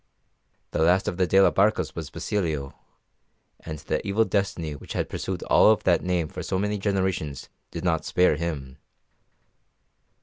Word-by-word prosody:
The - - -1
last 90 +4 +3
of 90 - -2
the 90 -1 +2
de 95 +4 +4
la 95 - +6
Barcas 105 +2 +2
was - - -6
Basilio, 80 -9 -2 0.9
and 80 - -7
the - - -3
evil 105 +3 +2
destiny 90 -7 -1
which 70 - -9
had - - -1
pursued - - -4
all - - +5
of 110 - +3
that 85 -2 +3
name 90 -3 0
for 90 +1 -7
so 95 +2 -2
many 105 +1 -1
generations 95 -8 -2 0.2
did 85 - -6
not 80 -4 +1
spare 90 -2 +3
him. 70 -4 -5
90 Hz, 165 wpm, -25 LUFS, 80-95 Hz, 0.9 s, la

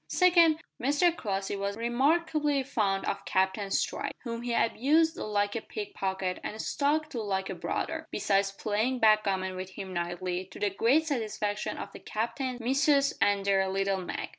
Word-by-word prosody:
Second, 340 -4 +5 0.2
Mr 295 +7 +3
Crossley 195 - -2
was 200 +1 -3
remarkably 285 +4 +1
fond 210 -8 0
of 200 0 -2
Captain 190 +1 0
Stride, - - -1
whom 230 -1 -4
he 240 0 -3
abused 310 +8 +2
like 205 0 -1
a 230 - -2
pick 410 - -7
pocket 190 - -2
and 215 - -5
stuck 300 +5 0
to 240 - -3
like 190 -2 -2
a - - -2
brother, - - -3
besides 195 0 +1
playing 215 +5 -1
backgammon 200 -4 +2
with 185 0 -5
him 190 0 -7
nightly, 175 +1 -3
to 190 - -12
the 205 -1 +1
great 250 +11 +3
satisfaction 215 -7 -2
of 200 - -6
the - - -10
Captain's 245 +3 -3
"missus" 275 +3 +3
and 200 -1 +2
their 195 -1 +2
"little 195 0 0
Mag." 180 - -4
215 Hz, 165 wpm, -29 LUFS, 195-275 Hz, 0.2 s, Second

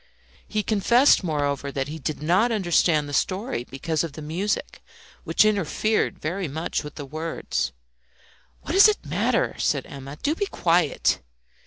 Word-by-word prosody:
He 215 -1 -1
confessed, 235 +5 +4
moreover, 145 -4 -1
that 135 0 -2
he 155 +2 -6
did 150 +1 -4
not 185 +9 +3
understand 175 -7 +2
the 145 - -7
story 190 - -1
because 155 +5 -2
of 165 -3 -5
the 155 - -8
music, 180 +8 -3 0.4
which - - +4
interfered 215 +1 +1
very 175 +4 -3
much 160 +4 -3
with 150 0 -9
the 145 - -6
words. 155 - -3 0.9
"What - - -5
does 390 +5 +8
it 425 - 0
matter?" - - 0
said - - 0
Emma. 140 +1 -9
"Do 295 - +2
be 400 +4 -2
quiet!" 170 - +1
165 Hz, 155 wpm, -24 LUFS, 145-210 Hz, 0.9 s, does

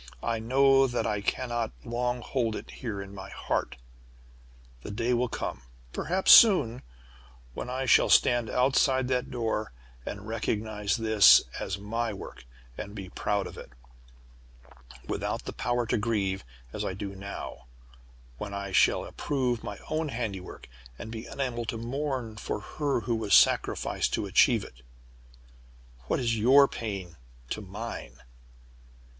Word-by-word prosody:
I 115 -1 -1
know 135 +3 +4
that 120 -1 -2
I 105 -2 -1
cannot 120 +1 -2
long 120 +1 -1
hold 115 -4 -1
it - - -8
here 105 -6 -5
in 100 0 -12
my 95 0 -8
heart. - - -2 1.1
The - - -8
day 115 +4 0
will 125 +1 +1
come 65 - -4 0.3
perhaps 185 +3 +2
soon 145 - +7 0.7
when 125 - -6
I 130 +1 -2
shall - - +5
stand 120 -2 +4
outside 130 0 +2
that 125 -1 0
door, 110 - -2 0.3
and 105 - -7
recognize 110 -1 -1
this 110 -3 +7 0.2
as 95 - -3
my 110 +3 -2
work, 60 -10 -10 0.3
and 100 0 -7
be 95 -3 -7
proud 100 +1 -1
of - - -9
it, - - -11 1.4
without - - -3
the - - -5
power 120 0 -1
to 115 - 0
grieve, 100 -3 -1 0.3
as - - -3
I 95 - -3
do 100 0 -6
now; 100 -9 -8 0.7
when 100 -1 -5
I 100 -1 -5
shall 95 - +3
approve 125 -5 -2
my 105 -1 -6
own 155 0 -1
handiwork, 110 -7 -5 0.3
and 110 - -8
be 115 0 -7
unable 125 -4 -3
to 115 - -3
mourn 125 -2 -3
for 105 - -3
her 140 +4 -2
who 120 -1 -1
was 110 -3 +3
sacrificed - - +3
to - - 0
achieve - - +4
it. - - -13 1.3
What - - 0
is 115 -3 0
your 135 +5 +7
pain 95 - -6 0.3
to 110 - -2
mine?" 100 - -8
115 Hz, 145 wpm, -28 LUFS, 100-125 Hz, 1.4 s, soon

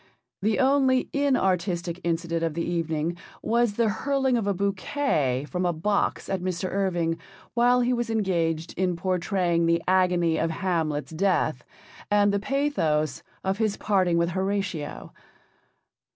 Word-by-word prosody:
The 215 +2 +1
only 265 -1 +3
inartistic 185 -10 0
incident 170 0 -1
of 165 -2 -1
the 170 - -1
evening 165 -1 -1 0.3
was 235 -1 +2
the 230 0 +2
hurling 265 +4 0
of 225 -4 0
a 200 - +2
bouquet 190 - 0
from 180 +2 -2
a 175 -1 +1
box 200 +6 0
at 190 -2 -2
Mr. 185 0 -2
Irving 175 -4 0 0.3
while 245 +1 +4
he 245 +1 +2
was 240 -1 -1
engaged 170 -7 0
in 180 -1 0
pourtraying 180 -1 0
the 170 0 +2
agony 180 -3 +3
of 165 - +1
Hamlet's 160 -4 -1
death, 160 -6 0 0.5
and 205 -1 +3
the 200 - +1
pathos 200 - 0 0.2
of 190 +2 -1
his 215 -2 0
parting 185 -5 +2
with 170 0 +2
Horatio. 190 -4 -3
185 Hz, 140 wpm, -26 LUFS, 170-210 Hz, 0.5 s, while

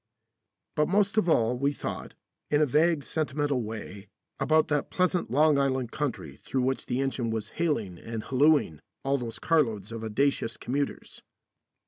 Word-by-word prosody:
But 150 0 +2
most 200 +2 +2
of 180 -5 +3
all 120 -4 +2
we 140 +1 +2
thought, - - -6 0.3
in 145 - +3
a 155 - +5
vague 150 +2 +2
sentimental 145 -3 -1
way, 105 -2 -7 0.3
about 155 0 +3
that 145 -1 0
pleasant 180 -1 +1
Long 150 +2 +4
Island 130 -3 0
country 145 -5 -4
through 130 -1 -2
which 130 +1 -1
the 125 +1 -1
engine 130 -3 -1
was 110 -1 -3
haling 115 - -1
and 115 -1 -5
hallooing 140 - +3 0.2
all 140 +1 +1
those 115 -2 -5
carloads 115 - +1
of 115 -1 -6
audacious 115 +1 0
commuters. 140 +3 -3
135 Hz, 155 wpm, -28 LUFS, 115-150 Hz, 0.3 s, a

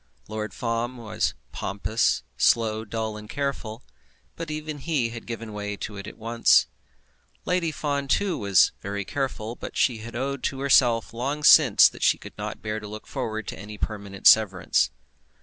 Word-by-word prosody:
Lord 110 0 -4
Fawn 120 +1 -2
was 110 -2 -2 0.2
pompous, 100 +4 0
slow, 110 -1 +2
dull, 110 0 -4
and 105 0 -11
careful; 130 -4 -4 0.5
but 165 -1 -6
even 155 -1 -5
he 135 -5 0
had 115 0 -9
given 115 -2 -6
way 105 0 -4
to 105 - -6
it 100 - -8
at - - -10
once. 115 +1 +4 0.8
Lady 180 -3 0
Fawn, 145 -2 -2
too, 195 +5 +1
was 100 - +4
very 100 0 -4
careful, 120 -4 -3
but - - -8
she 120 -4 +2
had 115 +2 -9
owned 135 +2 -3
to 135 - -2
herself 120 -5 +3
long 140 +6 -3
since 145 -7 +8
that - - -9
she - - +4
could - - -12
not - - -6
bear 110 0 -2
to 105 - -9
look 105 +1 -8
forward 110 -1 -4
to - - -7
any 105 +2 -9
permanent 100 -2 -6
severance. 100 -5 +5
115 Hz, 170 wpm, -25 LUFS, 105-135 Hz, 0.8 s, since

